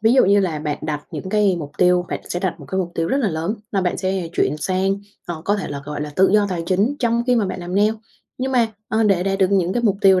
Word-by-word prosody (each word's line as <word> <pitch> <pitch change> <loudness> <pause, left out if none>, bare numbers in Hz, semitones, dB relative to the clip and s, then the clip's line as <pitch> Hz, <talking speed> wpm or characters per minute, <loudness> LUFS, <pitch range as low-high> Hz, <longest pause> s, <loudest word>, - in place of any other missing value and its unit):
Ví 220 +2 +4
dụ 265 - +6
như 200 +1 +4
là 170 -6 -1
bạn 150 -1 -3
đặt 150 -1 -3
những 160 +3 -6
cái 200 -2 +2
mục 145 -3 -6
tiêu, 180 0 +4
bạn - - -3
sẽ 175 - -2
đặt 185 -2 -1
một - - -11
cái 190 - -2
mục 180 -2 -1
tiêu 165 0 -1
rất - - +1
là 260 -7 +1
lớn 165 +4 -2 0.2
là 195 - +2
bạn 180 -1 0
sẽ 185 -2 -2
chuyển 150 - +1
sang, 190 +4 0 0.3
ờ, 165 -2 -5
có 205 +1 +2
thể 200 - -4
là, 140 -1 -5
gọi 150 0 -5
là, 150 0 -4
tự 190 +1 +5
do 205 -1 +4
tài 175 -3 -2
chính 200 +10 +1
trong 235 -1 +1
khi 250 -1 +3
mà 210 -4 +2
bạn 185 - -4
làm 175 +1 -5
nail. 210 +2 +3 0.4
Nhưng 260 +1 -2
mà, 240 -3 +4 0.2
ờ, 220 +1 +1
để 195 -4 +3
đạt 195 0 -1
được 190 -1 +3
những 190 -2 +2
cái 240 - -1
mục 200 -4 +2
tiêu 190 -2 +6
190 Hz, 300 wpm, -21 LUFS, 175-210 Hz, 0.4 s, dụ